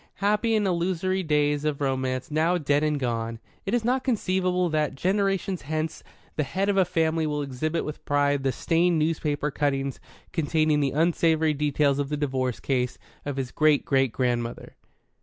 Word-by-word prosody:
Happy 210 +3 +1
and 210 -1 +2
illusory 185 +1 0
days 150 -3 +1
of 150 -2 -1
Romance 130 -1 -1
now 160 +4 +2
dead 145 -2 +1
and 150 -1 +1
gone! 115 -3 -2 0.3
It 205 - +1
is 235 -2 -1
not 255 +2 +1
conceivable 185 -6 +1
that, 155 -3 0
generations 195 +2 0
hence, 155 +2 -3 0.4
the - - +2
head 190 +8 -1
of 200 - +1
a 190 - +5
family 160 -2 +1
will 150 -1 -1
exhibit 150 +5 -2
with 150 - -7
pride 145 -1 +1
the 135 0 +1
stained 170 +6 +1
newspaper 150 -2 0
cuttings 135 -2 -1 0.3
containing 155 -2 +2
the 140 -2 +2
unsavoury 160 +1 +2
details 145 -1 +1
of 140 -1 -1
the 150 - -1
divorce 130 -4 -1
case 125 -2 -1 0.3
of 140 -1 -3
his 130 -2 -3
great 155 -2 +3
great 135 -3 +2
grandmother. 120 -1 -2
150 Hz, 170 wpm, -26 LUFS, 140-175 Hz, 0.4 s, a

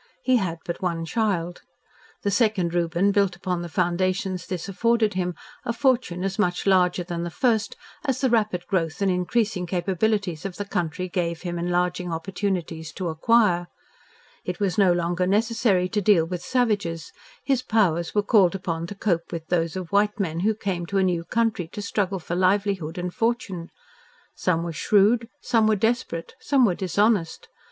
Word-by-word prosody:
He 255 -1 +4
had 180 -6 -2
but 170 - -4
one 170 -3 -1
child. 175 -4 -1 0.6
The 200 - +1
second 200 -5 +1
Reuben 175 +3 +2
built 200 -3 +2
upon 180 -1 -3
the 175 - -6
foundations 180 +1 -1
this 185 -1 -4
afforded 220 +2 +1
him, 180 -1 -2 0.3
a 245 - -1
fortune 235 -8 +1
as 195 +1 -3
much 180 -4 0
larger 180 -2 +3
than 170 -1 -4
the 175 - -3
first 225 +3 0 0.3
as 270 -4 -1
the 260 - +2
rapid 210 -6 +1
growth 175 -1 -1
and 195 - +3
increasing 180 +1 0
capabilities 185 0 -1
of 195 -2 -5
the 205 - -4
country 180 -1 -2
gave 170 -2 -2
him 175 -1 -3
enlarging 180 0 -1
opportunities 170 -2 -3
to 185 -3 -3
acquire. 175 0 +3 0.8
It - - -4
was 195 -3 0
no 195 -4 +4
longer 175 +1 0
necessary 210 -2 +2
to 210 +1 0
deal 190 -5 +4
with 175 +1 -5
savages: 205 -11 -1 0.3
his 270 -3 +1
powers 190 -9 +1
were 205 - +3
called 195 -4 +4
upon 170 -3 -3
to 205 - -7
cope 175 -4 -1
with 165 -1 -6
those 165 -1 0
of 185 -3 -5
white 210 +2 +2
men 165 -4 -1
who 215 +4 +1
came 185 -5 -3
to 200 - -1
a 190 - +3
new 175 -2 0
country 225 -6 0
to 210 - -5
struggle 200 -1 -1
for 175 0 -4
livelihood 185 -3 +1
and 180 0 -3
fortune. 225 -7 -2 0.6
Some 170 -2 0
were 170 -1 -4
shrewd, 215 +7 +3
some 225 -3 +2
were 215 - +4
desperate, 215 -6 -1
some 270 -3 +3
were 195 - +2
dishonest. 190 0 0
185 Hz, 175 wpm, -24 LUFS, 175-210 Hz, 0.8 s, He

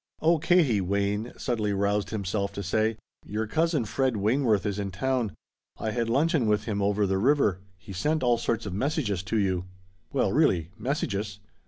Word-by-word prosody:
"Oh 165 +1 +3
Katie," 155 - +3
Wayne 100 +4 -1
suddenly 110 -5 -1
roused 100 +1 0
himself 100 -1 -2
to 100 - -4
say, 110 +4 +1 0.3
"your 110 +2 -3
cousin 155 +1 +1
Fred 130 +2 0
Wayneworth 110 -1 +2
is 105 -1 -1
in 100 -1 -2
town. 120 +2 -1 0.4
I 110 - -2
had 115 0 -1
luncheon 140 0 +2
with 105 0 +2
him 105 -2 -2
over 100 +1 +2
the 95 0 0
river. 120 -6 +3 0.2
He 95 +1 -10
sent 150 - 0
all 120 -1 +3
sorts 115 -1 -1
of 100 - -4
messages 110 - -1
to 95 +4 -2
you." 95 -3 0 0.5
"Well - - +1
really! 85 -2 +2
Messages! 105 -5 -2
105 Hz, 175 wpm, -27 LUFS, 100-125 Hz, 0.5 s, Oh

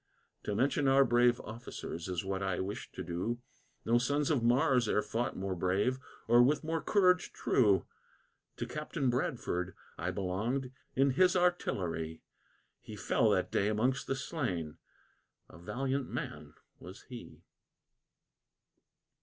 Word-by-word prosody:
To 105 - -1
mention 135 +4 +2
our 135 0 +6
brave 120 0 +4
officers, 110 -7 -7
is 90 0 -3
what 95 0 -2
I 95 -2 -1
wish 100 +5 -5
to 95 - -5
do; 90 +7 -2 0.5
No 120 +1 +4
sons 145 +4 +1
of 140 -6 +2
Mars 125 0 +3
e'er 105 - +2
fought 120 +2 -2
more 95 0 -2
brave, 95 +9 +1 0.3
or 120 +1 +6
with 145 +5 +3
more 160 0 -1
courage 185 -3 +3
true. 105 -6 +3 0.7
To - - -3
Captain 150 -3 -2
Bradford 95 -7 -2 0.2
I 85 +2 -1
belonged, 105 +8 -2 0.2
in 135 +1 +4
his 180 +7 +4
artillery, 90 - 0 0.6
He - - -9
fell - - +2
that - - +1
day 100 - +2
amongst 120 +6 0
the 135 - 0
slain, 95 - -3 0.7
a - - -14
valiant 130 +8 -2
man - - -6 0.2
was 95 +5 -11
he. 125 -2 -11
120 Hz, 135 wpm, -32 LUFS, 95-135 Hz, 0.7 s, our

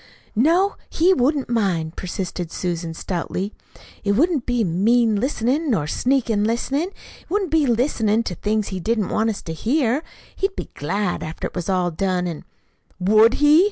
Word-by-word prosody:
"No, 335 - +3
he 355 +4 +4
wouldn't 280 -2 +1
mind," 185 -9 0
persisted 180 -2 -4
Susan 170 -2 -3
stoutly. 185 +3 -3 0.5
"It 200 -1 +2
wouldn't 295 - +2
be 245 -2 +1
a - - +1
mean 215 +6 +3
listenin', 265 +5 0
nor 185 - +1
sneak 255 - +1
listenin'. 235 - 0
It 395 - -19
wouldn't 390 -1 0
be 310 -3 +3
listenin' 230 -3 +2
to 185 - -3
things 210 +4 -1
he 190 - -4
didn't 215 +1 0
want 220 +1 +1
us 215 - -4
to 165 - -5
hear. 250 - +1 0.3
He'd 390 0 -1
be - - -6
glad, 180 +6 -2
after 155 +1 -5
it - - -5
was 180 +1 -4
all 180 -2 +1
done, 180 +1 0
an' 170 -3 -5 0.3
" - - -38
"Would 215 +5 +5
he!" 295 +2 +6
220 Hz, 175 wpm, -22 LUFS, 185-270 Hz, 0.5 s, he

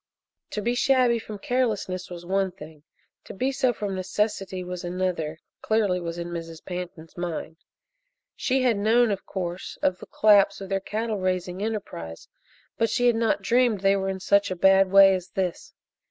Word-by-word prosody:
To 210 - -4
be 240 - +1
shabby 245 -2 +3
from 215 -1 -8
carelessness 205 -6 -1
was 175 -1 -8
one 190 +1 0
thing 155 -4 -13 0.4
to - - -9
be 260 +7 0
so 260 -2 +2
from 205 -3 -4
necessity 190 0 -2
was 180 0 -6
another, 175 -3 -2 0.2
clearly 210 -5 +1
was 170 -1 -5
in 170 0 -5
Mrs. 165 -1 -7
Pantin's 175 -3 -7
mind. 170 -2 -5 0.8
She 265 0 0
had 240 -4 +3
known, 225 +3 +3
of 195 - -4
course, 180 -2 -5
of 185 -1 +1
the - - -11
collapse 200 -2 +4
of 195 -1 -8
their 195 0 0
cattle 215 +2 -3
raising 185 0 -2
enterprise, 195 - -5 0.5
but 230 - +2
she 245 +3 +1
had 240 -1 +4
not 225 -1 +1
dreamed 240 -4 +2
they 195 0 +4
were 195 0 -1
in 190 0 -3
such 200 +2 +2
a 185 - -2
bad 190 +1 +5
way 195 0 +8
as 185 -1 -3
this. 185 -3 -2
195 Hz, 180 wpm, -25 LUFS, 180-220 Hz, 0.8 s, way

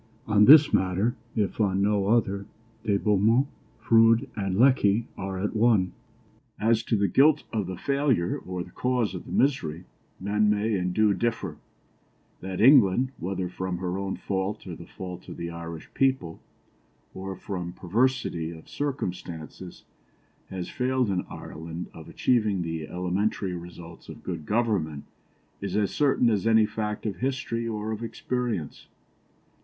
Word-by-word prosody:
On 105 -1 +5
this 150 +3 +8
matter, 95 +6 +1 0.2
if 105 -1 0
on 100 -1 +2
no 100 -1 +2
other, 100 -3 +1 0.4
De 105 -3 +2
Beaumont, 105 +6 +3 0.3
Froude, 115 0 +4
and 95 -3 -2
Lecky 115 -3 +4
are 95 0 -4
at 105 +4 -2
one. 110 -5 +3 0.7
As 115 +1 +3
to 115 - +1
the 100 0 +2
guilt 145 - +4
of 105 -5 -1
the 95 -1 -5
failure 140 -11 +1
or 90 -1 -5
the - - -14
cause 125 -4 0
of - - -7
the - - -8
misery, 90 - +1 0.4
men 105 +2 +1
may 105 +2 +1
and 90 -2 0
do 105 +1 +3
differ; 100 -9 -2 0.8
that 95 0 -5
England, 125 -1 +6
whether 95 0 -2
from 90 0 -4
her 90 0 -3
own 100 -1 -3
fault 95 +2 -3
or 90 -3 -6
the - - -11
fault 90 -1 -8
of - - -8
the 85 0 -4
Irish 85 -1 -8
people, 130 -12 0 0.7
or 95 0 -6
from 90 -2 -5
perversity 100 -3 0
of 80 -1 -11
circumstances, 90 - -5 0.7
has 95 -2 -5
failed 125 -3 0
in 90 -2 -2
Ireland 80 +2 -7
of - - -11
achieving 105 -7 +1
the 80 -2 -4
elementary 90 +2 -1
results 85 -1 -10
of - - -10
good 75 - -5
government 100 -11 0 0.6
is 100 -2 -3
as 105 -2 +1
certain 135 -5 +3
as 105 +1 0
any 110 -1 +5
fact 105 0 -4
of 100 -5 -2
history 115 -1 -2
or 110 -1 -3
of 110 0 -4
experience. 115 - -3
100 Hz, 150 wpm, -26 LUFS, 90-115 Hz, 0.8 s, this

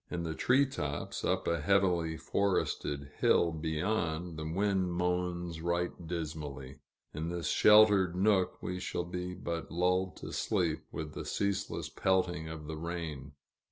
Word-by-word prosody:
In 85 -1 -3
the 80 -1 -2
tree 130 - +3
tops, 75 - -4
up - - 0
a 85 -2 +1
heavily 85 -2 +2
forested 75 -8 -1
hill 85 - +4
beyond, 80 +1 -1
the 80 0 -4
wind 95 0 +1
moans 90 -1 -1
right 85 +1 0 0.2
dismally. 75 -5 -5 0.3
In 80 +3 -3
this 85 -1 -2
sheltered 105 -4 +6
nook, 95 -1 +2
we 90 0 -3
shall 90 -1 -3
be 90 +1 -4
but 85 -2 -4
lulled 90 +2 +1
to - - -7
sleep - - 0
with 75 -1 -5
the - - -5
ceaseless 100 -1 -2
pelting 90 -4 0
of 80 -2 -7
the 80 +1 -5
rain. 80 -4 -5
85 Hz, 145 wpm, -32 LUFS, 80-90 Hz, 0.3 s, sheltered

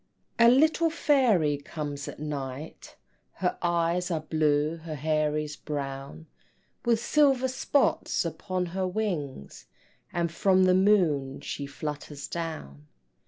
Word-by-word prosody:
A 235 0 +8
little 315 +6 +4
fairy 240 - +3
comes 145 -1 -5
at - - -7
night, 145 -1 -6 0.4
Her 180 -1 -1
eyes 175 +1 +1
are 165 -3 -1
blue, 155 0 +1
her 160 -1 -7
hair 155 0 0
is 150 -1 -3
brown, 135 - -6 0.6
With 235 -2 +2
silver 270 0 +3
spots 260 -5 +1
upon 180 +3 -3
her 190 -1 0
wings, 175 - -4 0.4
And 170 -1 -1
from 185 +2 +3
the 185 0 +5
moon 175 -9 +2
she 140 - -5
flutters 145 0 -6
down. 155 - -6
160 Hz, 120 wpm, -27 LUFS, 145-190 Hz, 0.6 s, A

